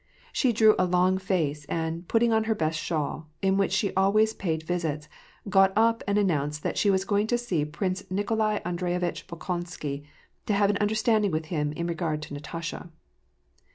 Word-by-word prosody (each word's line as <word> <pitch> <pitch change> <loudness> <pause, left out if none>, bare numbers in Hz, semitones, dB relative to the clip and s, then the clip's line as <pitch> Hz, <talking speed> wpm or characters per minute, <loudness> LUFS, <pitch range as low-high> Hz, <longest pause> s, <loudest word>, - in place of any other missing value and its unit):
She 255 - +2
drew 220 -1 +6
a 185 - +4
long 180 +1 +2
face, 160 -6 -1
and, 165 +2 -3
putting 230 0 +3
on 220 0 +2
her 220 0 +1
best 155 -4 -1
shawl, 155 0 -3
in 190 0 +3
which 195 -1 +1
she 200 +1 +1
always 215 +3 +3
paid 160 -6 -2
visits, 160 -3 -2 0.4
she - - -8
got 195 -1 +5
up 230 +1 +3
and 200 0 +2
announced 150 -7 0
that - - -1
she 205 - +2
was 190 -1 +2
going 205 +1 +1
to 240 - +2
see 190 -11 -1
Prince 185 +5 -3
Nikolai 210 +2 0
Aiidreyevitch 175 0 -2
Bolkon 175 +1 -4
sky, 145 -5 -5 0.5
to 210 - +2
have 200 0 +3
an 205 - -1
understanding 215 0 +2
with 160 -2 -2
him 150 -2 0
in 170 +2 -3
regard 165 -3 -2
to 150 - -8
Natasha. 165 +4 -6
185 Hz, 190 wpm, -27 LUFS, 160-205 Hz, 0.5 s, drew